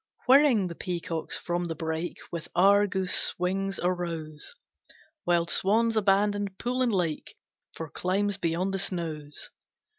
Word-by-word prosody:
Whirring 260 -6 +5
the 175 - -4
peacocks 170 -2 -3
from 175 0 -2
the 165 -1 -3
brake 160 +2 -3
With 170 -2 -5
Argus 190 0 +3
wings 195 +2 -1
arose, 170 - -3 0.7
Wild 170 -1 +2
swans 225 +4 +2
abandoned 205 -1 +2
pool 250 +1 -1
and 250 -2 +2
lake 175 -6 -2 0.4
For 160 - -5
climes 195 +5 -1
beyond 180 +2 -1
the 195 - -1
snows. 155 -6 -4
185 Hz, 125 wpm, -28 LUFS, 170-200 Hz, 0.7 s, Whirring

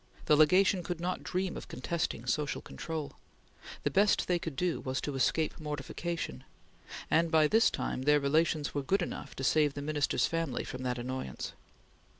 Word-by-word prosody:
The 150 - +5
Legation 180 +5 +5
could 175 -1 -4
not 180 +2 -2
dream 185 0 -2
of - - -7
contesting 125 -3 -3
social 145 +4 0
control. 160 -3 -5 0.7
The - - +1
best 205 +1 +3
they 180 -1 +2
could 165 -4 -5
do 175 +3 0
was 130 0 -2
to 145 - -3
escape 155 +4 +1
mortification, 150 - -4 0.7
and 165 +1 +4
by 160 -1 +5
this 225 +7 +5
time - - -3
their 150 +2 +4
relations 150 +1 +1
were 145 - -1
good 185 +7 +1
enough - - -6
to 135 - -5
save 145 +1 +3
the 145 - -4
Minister's 150 -1 +1
family 165 -6 -1
from 130 - -6
that 125 -1 -1
annoyance. 125 - -5
155 Hz, 170 wpm, -31 LUFS, 135-170 Hz, 0.7 s, The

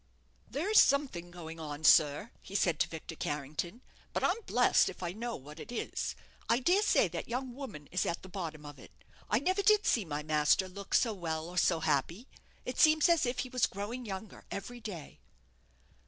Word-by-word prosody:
"There's 390 +10 +3
something 265 -12 +1
going 165 -2 -9
on, 150 -1 -6
sir," 150 +7 +5
he 195 - -10
said 170 -5 +2
to - - +3
Victor 165 0 -8
Carrington; 150 - -4 0.3
"but - - -1
I'm 410 +6 +1
blest - - +4
if - - -9
I 175 - -2
know 230 +4 -4
what 150 +4 -11
it - - -9
is. 240 - -3 0.3
I 235 - +4
dare 355 +10 +3
say 410 - +4
that 165 0 -5
young 250 +1 -3
woman 220 - -8
is 185 - 0
at 170 - -3
the - - -9
bottom 165 -5 -6
of 145 -2 -10
it. - - -17 0.3
I 210 - +3
never 370 - +1
did 425 +1 +4
see 230 - +3
my 150 -3 -4
master 155 +4 +3
look 195 +1 -4
so 230 -3 +3
well 160 -4 -3
or 180 +1 -8
so 165 0 +2
happy. 165 - 0 0.4
It 250 - -4
seems 310 0 +6
as 335 -6 +3
if 245 +1 -1
he - - -9
was 250 -1 +2
growing 210 +6 -5
younger 195 +1 -7
every 240 +5 -6
day." 190 - -8
190 Hz, 200 wpm, -32 LUFS, 160-250 Hz, 0.4 s, seems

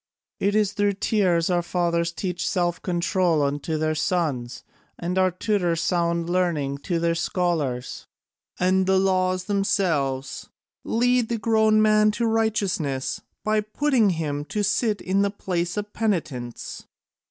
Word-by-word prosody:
It 200 +1 +1
is 210 -2 +2
through 205 -1 +1
tears 185 -4 +1
our 175 -1 +2
fathers 170 -1 0
teach 180 +1 -3
self 175 -1 0
control 175 -3 +1
unto 145 +3 -1
their 155 0 0
sons, 155 -7 -2 0.3
and 175 +1 -3
our 185 0 +4
tutors 180 -3 0
sound 170 0 0
learning 165 -6 0
to 175 +4 -2
their 170 0 +1
scholars, 165 -8 -2 0.5
and 185 +1 +2
the 190 0 +4
laws 185 -1 +1
themselves 175 -10 -1 0.3
lead 245 0 +1
the 235 - 0
grown 220 -1 +3
man 215 0 +4
to 230 +3 -1
righteousness 205 - -1 0.2
by 215 0 +2
putting 230 +1 +1
him 145 -2 -2
to 210 +6 -2
sit 210 0 +1
in 190 +2 +1
the 200 - +2
place 180 -2 -3
of 210 0 -4
penitence. 155 - -3
180 Hz, 140 wpm, -24 LUFS, 165-205 Hz, 0.5 s, our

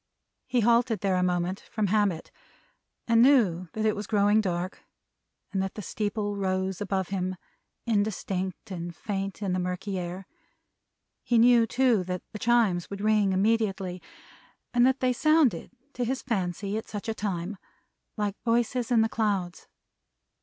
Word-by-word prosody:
He 250 -1 +1
halted 235 0 +3
there 195 -2 +1
a 180 - +1
moment, 180 +1 0
from 215 -2 0
habit; 200 -4 0 0.8
and 230 -1 +5
knew 205 - +4
that 220 0 -2
it 215 - +2
was 205 0 -5
growing 210 0 +3
dark 180 -2 -3 0.7
and 190 - +1
that 190 0 -3
the 210 - -6
steeple 205 +1 -2
rose 190 -1 -1
above 190 -2 -1
him 185 -1 -2 0.5
indistinct 205 -4 -2
and 170 -1 -5
faint 195 +1 -4
in 190 -2 0
the 185 - 0
murky 180 +2 -3
air. 180 +2 -6 1.0
He 240 - +1
knew, 235 0 +6
too, 245 -5 +2
that 180 0 -4
the 215 - -6
Chimes 225 -7 +2
would 200 - -6
ring 210 -2 +3
immediately, 195 -2 0 0.7
and 245 +1 +5
that 265 +1 +1
they 255 -1 +2
sounded 300 - +3 0.2
to 250 - -2
his 260 +3 -2
fancy, 200 -2 -2
at - - -11
such 210 +1 -6
a 225 - 0
time, 195 -2 -3 0.6
like 205 -1 -2
voices 235 +1 +1
in 235 -3 +4
the 225 - +3
clouds. 200 -6 -2
205 Hz, 155 wpm, -27 LUFS, 185-225 Hz, 1.0 s, knew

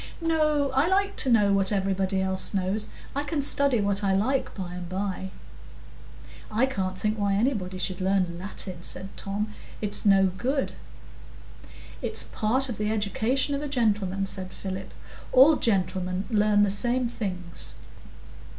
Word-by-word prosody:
"No; 305 -4 +1
I 270 +4 +2
like 395 +2 +1
to 265 - +4
know 210 -4 +4
what 195 0 +2
everybody 195 -1 0
else 190 +1 +1
knows. 195 +3 -1 0.3
I 285 - 0
can 290 +1 -2
study 280 -3 +3
what 200 0 0
I 195 -1 +2
like 255 +7 0
by 180 -3 -5
and 180 -1 -6
by." 190 0 -3 1.2
"I 220 +4 +2
can't 190 -8 -3
think 215 +2 -1
why 200 -1 +1
anybody 200 -5 0
should 185 0 -3
learn 185 -2 +1
Latin," 185 -2 -5
said 190 +2 -6
Tom. 210 +2 -3 0.3
"It's 210 -1 +1
no 195 -2 +5
good." 270 +2 -1 1.3
"It's - - +3
part 255 +5 0
of 240 -5 -5
the 210 0 0
education 220 +6 0
of 280 - -1
a 295 - -3
gentleman," 205 -7 0
said 190 -1 -4
Philip. 190 0 -6 0.4
"All 275 +5 +7
gentlemen 185 -3 0
learn 210 -1 +4
the 200 - +2
same 240 +4 +2
things." 180 -7 -5
205 Hz, 150 wpm, -26 LUFS, 190-255 Hz, 1.3 s, All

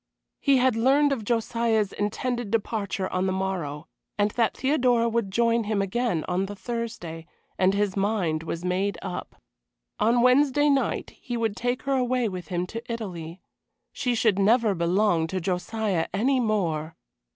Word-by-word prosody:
He 280 -2 +4
had 255 -2 +3
learned 275 +5 +4
of 255 -6 -1
Josiah's 225 -2 0
intended 235 +2 -2
departure 205 -3 -1
on 185 +1 +1
the - - +1
morrow, 180 -6 -3 0.3
and 205 0 +2
that 230 0 0
Theodora 250 -4 +2
would 230 -3 0
join 230 +2 +2
him 210 -1 0
again 195 -3 0
on 185 +2 0
the 205 - -7
Thursday, 205 -8 -5 0.3
and 190 +1 +3
his 200 -1 0
mind 195 -6 0
was 165 +1 -5
made 190 +3 0
up. 180 -2 -6 0.6
On 235 +3 +3
Wednesday 285 +3 +4
night 275 -1 0
he 240 -1 -4
would 225 -3 -1
take 245 +4 -2
her 275 - 0
away 250 -2 +1
with 180 -5 -6
him 175 +1 -2
to 230 +5 -7
Italy. 180 -6 -6 0.5
She 245 -2 -1
should 215 -4 +2
never 220 +1 +4
belong 170 -1 +2
to 185 +3 -2
Josiah 185 +1 -1
any 260 +6 +2
more. 170 -9 -1
210 Hz, 160 wpm, -26 LUFS, 185-240 Hz, 0.6 s, He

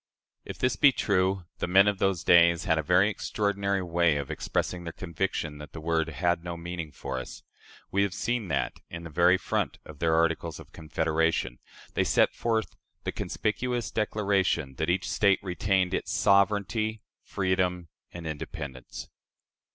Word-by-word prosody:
" - - -54
If - - -11
this 125 -1 0
be 140 - +7
true, 95 -5 +1
"the - - -1
men 95 +3 +6
of 100 -2 +1
those 95 -4 +1
days" 85 -1 +5
had 80 -3 +2
a - - +2
very 75 - +4
extraordinary 100 -2 -1
way 85 -3 +2
of 70 +1 -4
expressing 85 +3 -2
their 85 - -5
conviction 80 -3 -3
that 75 0 -10
the 80 - -7
word 80 0 0
"had 85 +1 0
no 85 -1 -5
meaning 85 -2 -5
for 65 -1 -5
us." 65 - -9 0.5
We 100 - +2
have 100 -2 0
seen 120 -3 -1
that, - - -2
in 85 0 -7
the 80 - -8
very 90 +4 +4
front - - -2
of 75 -2 -12
their 80 -1 +2
Articles 80 0 0
of - - -13
Confederation, 80 -5 -1 0.3
they - - +2
set - - +3
forth 110 -2 -1 0.3
the - - -2
conspicuous 120 +2 -2
declaration 100 -9 0
that 80 +1 0
each 90 0 0
State 95 +4 +3
retained 95 0 0
"its - - -2
sovereignty, 105 +2 +2 0.2
freedom, 90 -2 -1 0.2
and 85 -1 -8
independence." 75 -4 -6
90 Hz, 165 wpm, -28 LUFS, 80-100 Hz, 0.5 s, be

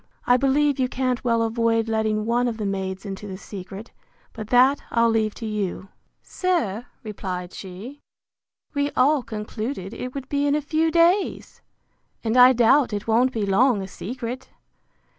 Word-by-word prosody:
I 245 - +5
believe 275 +2 +2
you 255 -1 +1
can't 255 -1 -1
well 230 -2 +2
avoid 225 0 +1
letting 220 -1 0
one 240 +2 +1
of 230 -2 -3
the 215 - -3
maids 190 0 -3
into 195 +1 -6
the 190 -1 -6
secret; 195 +2 -9 0.4
but 215 -3 -7
that 255 +4 +4
I'll 230 -1 +3
leave 220 -2 0
to 230 - -7
you. 200 -3 -3 0.3
Sir, 280 - -1 0.2
replied 185 -4 -5
she, 205 +10 -9 0.7
we 285 -1 0
all 280 +3 +4
concluded 220 -1 -5
it 250 +3 -6
would 270 -2 -5
be 285 0 0
in 285 - +2
a - - +2
few 315 +2 0
days! 340 +4 +1 0.6
and 225 0 0
I 250 0 +8
doubt 245 +1 +3
it 205 0 -3
won't 235 +3 +3
be 220 -4 -2
long 205 +2 +3
a - - -6
secret. 245 +6 -6
230 Hz, 165 wpm, -23 LUFS, 210-260 Hz, 0.7 s, I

